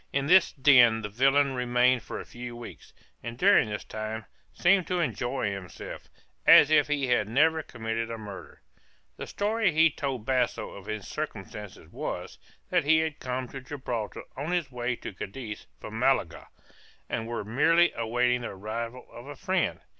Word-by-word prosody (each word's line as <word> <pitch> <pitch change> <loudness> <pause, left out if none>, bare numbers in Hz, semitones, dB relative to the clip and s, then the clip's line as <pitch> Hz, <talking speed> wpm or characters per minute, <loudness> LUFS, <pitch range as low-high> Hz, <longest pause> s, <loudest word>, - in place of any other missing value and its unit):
In 140 0 0
this 180 +3 +5
den 125 -5 +5
the 105 - -4
villain 135 +5 +3
remained 125 0 +2
for - - -7
a - - -8
few 120 0 -8
weeks, 120 0 -11 0.3
and 115 0 -7
during 195 - +5
this 105 0 -4
time 110 0 -5 0.3
seemed 185 0 +3
to 180 -1 0
enjoy 130 -8 -1
himself 95 -2 -8 0.4
as 150 - +8
if 150 -2 +5
he 145 -2 0
had 120 -4 +1
never 160 +6 +3
committed 115 -2 -4
a 115 - -4
murder. 100 - -10 0.5
The - - -6
story 210 -1 +1
he 160 +1 +4
told 135 -6 -4
Basso 125 -2 0
of 100 0 -11
his 110 -2 -5
circumstances 105 -8 -7
was, - - -5 0.3
that - - +3
he 160 +2 +4
had 160 -2 -3
come 130 0 -3
to 135 - -8
Gibraltar 125 -5 -5
on 145 +5 -4
his 175 -6 -1
way 120 0 -2
to 110 - -8
Cadiz 105 +3 -7
from - - -7
Malaga, - - +1 0.6
and 115 -1 -3
was 115 -3 -4
merely 165 +10 +3
awaiting 120 +2 +1
the 120 - -4
arrival 115 +5 -6
of 120 +3 -11
a 145 - -8
friend. 190 +2 -1
125 Hz, 170 wpm, -28 LUFS, 115-145 Hz, 0.6 s, as